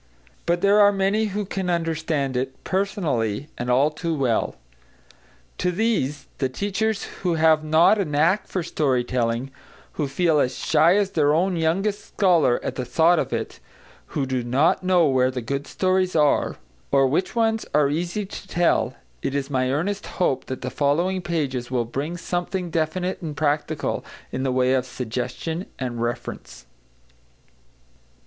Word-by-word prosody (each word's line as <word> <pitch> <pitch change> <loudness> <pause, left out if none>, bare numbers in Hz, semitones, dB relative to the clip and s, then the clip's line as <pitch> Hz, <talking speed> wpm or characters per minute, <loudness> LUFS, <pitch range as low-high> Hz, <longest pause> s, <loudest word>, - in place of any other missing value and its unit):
But 175 0 +1
there 200 +1 +5
are 205 0 +7
many 200 +2 +1
who 205 0 -2
can 190 -1 -3
understand 160 -5 -1
it, 130 +1 -3
personally 155 - -1
and 120 +1 -4
all 135 +5 +4
too 165 +1 -3
well. 130 -6 0 1.0
To 180 - +1
these, 170 - 0
the 130 - +1
teachers 205 +7 -1 0.2
who 180 -3 +1
have 160 -1 +4
not 160 +7 +4
a 200 - +1
knack 160 +7 +2
for 185 - -2
story 140 -6 +1
telling, 120 +1 -1 0.4
who 150 - -2
feel 160 +2 +2
as 125 -2 0
shy 160 +3 +4
as 200 -2 +1
their 150 -2 +3
own 180 +3 +1
youngest 195 +6 0
scholar 175 -10 +2
at - - -2
the 130 - -1
thought 165 +6 +3
of - - -2
it, - - -4 0.6
who 140 - +1
do 130 -2 -2
not 130 +7 +2
know 180 -2 +4
where 130 -3 +3
the 130 -1 -3
good 140 +4 -3
stories 185 -1 +1
are, 150 -2 +3 0.4
or 135 -1 +5
which 160 - 0
ones 225 -1 +1
are 150 -1 +4
easy 175 +6 -2
to 195 - -9
tell, 175 -2 +1 0.3
it 140 - -2
is 140 0 -2
my 130 -1 +1
earnest 195 +9 -2
hope 160 -8 +1
that 130 - -6
the 125 - -3
following 170 +6 +1
pages 140 -8 -2
will 125 -2 0
bring 145 +8 -4
something 175 +1 -3
definite 175 +4 -1
and 155 -4 -5
practical 150 0 -1 0.3
in - - -3
the 135 -1 0
way 130 0 +2
of 130 -1 +2
suggestion 125 - -4
and 120 -3 -4
reference. 120 +1 -5
155 Hz, 165 wpm, -23 LUFS, 130-185 Hz, 1.0 s, are